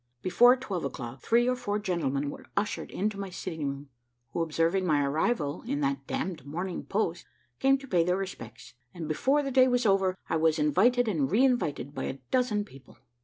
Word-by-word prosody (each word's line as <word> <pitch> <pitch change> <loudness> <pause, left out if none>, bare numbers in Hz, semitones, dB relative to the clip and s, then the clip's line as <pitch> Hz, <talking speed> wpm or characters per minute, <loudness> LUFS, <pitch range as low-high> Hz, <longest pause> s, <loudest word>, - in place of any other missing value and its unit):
Before 245 +7 +6
twelve 205 -9 -4
o'clock, 130 -2 -6
three 240 +1 +3
or 250 - +2
four 205 -4 -2
gentlemen 145 -8 -1
were - - -11
ushered 205 +1 -1
into 205 +1 -2
my 195 -1 -4
sitting 165 -5 -4
room, 140 +1 -6 0.4
who - - -1
observing 165 +3 +1
my 150 -5 +2
arrival 150 +1 0
in 280 +3 -1
that 280 -1 -1
damn'd 190 - -3
Morning 175 +6 -4
Post, 180 -4 -2 0.3
came 270 0 +4
to 275 0 -12
pay 175 -7 +3
their 180 +2 +1
respects; 185 - -7 0.2
and 165 -3 -5
before 270 - +2
the 275 - -3
day 260 0 +6
was 245 -1 +1
over, 195 -2 +3
I 160 - 0
was 160 0 +2
invited 220 - +3
and 155 -10 0
re 235 - +4
invited 145 - 0
by - - -4
a 135 - -4
dozen 240 -5 +1
people. 135 -9 -16
185 Hz, 195 wpm, -28 LUFS, 150-240 Hz, 0.4 s, Before